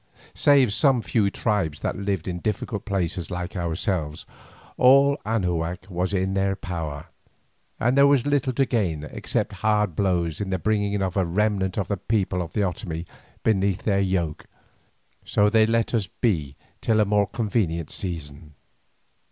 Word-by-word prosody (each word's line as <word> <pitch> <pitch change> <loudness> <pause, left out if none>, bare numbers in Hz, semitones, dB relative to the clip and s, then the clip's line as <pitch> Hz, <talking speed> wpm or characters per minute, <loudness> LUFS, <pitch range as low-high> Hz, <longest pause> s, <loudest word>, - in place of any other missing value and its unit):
Save 135 -7 +4
some 130 -2 +3
few 105 -3 +1
tribes 95 -8 -1
that - - -1
lived 100 -3 -2
in 90 -1 -3
difficult 105 +1 -3
places 90 -5 -2
like 90 +2 -5
ourselves, 85 -2 -2 0.5
all 140 +2 +6
Anahuac 90 -6 -1
was 90 +2 -1
in 95 0 0
their 95 0 +1
power, 80 -6 -5 0.7
and 120 +3 +2
there 140 0 +6
was 140 -3 +3
little 145 -2 +1
to 135 +2 +2
gain 95 - -1
except 75 - -3
hard 105 -5 +2
blows 85 -4 0
in 100 - -3
the 95 - 0
bringing 100 +1 0
of 95 0 -2
a 95 - +3
remnant 95 +1 0
of 100 - -1
the 100 - -1
people 95 -2 -1
of 85 -2 -6
the 105 - 0
Otomie 90 -3 -3 0.4
beneath 100 -3 +1
their 100 -3 +2
yoke, 90 -5 -1 0.8
so 105 0 +2
they 110 -1 +5
let 115 +1 +1
us 110 -5 +1
be 80 - -1 0.3
till 110 -1 +2
a 105 - +4
more 105 0 +2
convenient 100 -8 -1
season. 75 -4 -6
95 Hz, 160 wpm, -24 LUFS, 85-110 Hz, 0.8 s, all